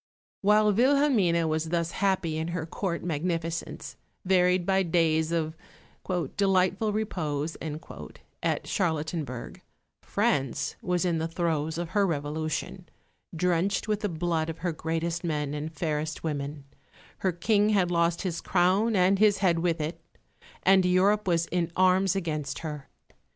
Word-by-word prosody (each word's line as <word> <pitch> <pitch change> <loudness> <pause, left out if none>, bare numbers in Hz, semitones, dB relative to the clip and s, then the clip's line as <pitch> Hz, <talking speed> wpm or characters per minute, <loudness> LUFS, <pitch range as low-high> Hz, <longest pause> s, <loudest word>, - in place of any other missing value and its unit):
While 210 +1 +4
Wilhelmine 235 - +3
was 160 0 -1
thus 170 0 0
happy 190 -5 0
in 160 - -2
her 170 -2 -3
Court 170 +1 -3
magnificence, 165 0 -3 0.3
varied 180 -1 +3
by 195 0 +3
days 160 -2 +2
of 160 -1 -1 0.8
"delightful 195 +2 +2
repose," 160 -8 -2
at 155 0 -5
Charlottenburg, 155 - -2 0.4
France 135 -4 0
was 180 0 0
in 170 -2 +1
the 160 - -1
throes 160 -2 -1
of 170 -1 -3
her 200 0 +2
Revolution, 160 +4 -3 0.5
drenched 180 +5 +1
with 210 -1 0
the 210 -1 -2
blood 165 -1 -1
of 165 - -5
her 175 - +1
greatest 165 +2 -2
men 150 -4 -2
and 150 +2 -4
fairest 155 -1 -3
women; 145 -2 -4 0.6
her 190 - +1
King 205 +5 +2
had 190 -4 +2
lost 170 0 +1
his 175 -3 -3
crown 190 +5 +2
and 190 +1 +3
his 210 -1 +5
head 180 -4 +2
with 170 -1 0
it; 160 +2 -4 0.6
and 190 0 +5
Europe 190 +3 +3
was 170 -2 +2
in 170 -1 -1
arms 185 +1 +3
against 155 -7 -3
her. 150 -3 -6
170 Hz, 140 wpm, -27 LUFS, 160-190 Hz, 0.8 s, his